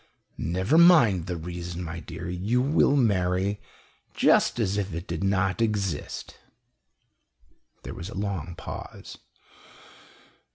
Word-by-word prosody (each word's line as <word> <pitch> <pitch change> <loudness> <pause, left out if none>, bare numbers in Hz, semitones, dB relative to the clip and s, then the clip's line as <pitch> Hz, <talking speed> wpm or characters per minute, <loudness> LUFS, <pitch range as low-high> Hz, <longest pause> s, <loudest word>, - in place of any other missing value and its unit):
"Never 95 - +2
mind 120 - +6
the 90 -1 -3
reason, 85 +1 -6
my 85 0 -6
dear. 85 +2 -8
You 95 +7 0
will 140 +1 +3
marry 100 -4 +1 0.5
just - - +3
as 100 -3 0
if 100 -4 -2
it 85 +2 -5
did 85 +1 -4
not 95 0 +1
exist." 100 -8 -2 1.4
There - - -7
was 85 - -7
a 115 - -9
long 95 -5 -3
pause. - - -9
95 Hz, 120 wpm, -26 LUFS, 85-105 Hz, 1.4 s, mind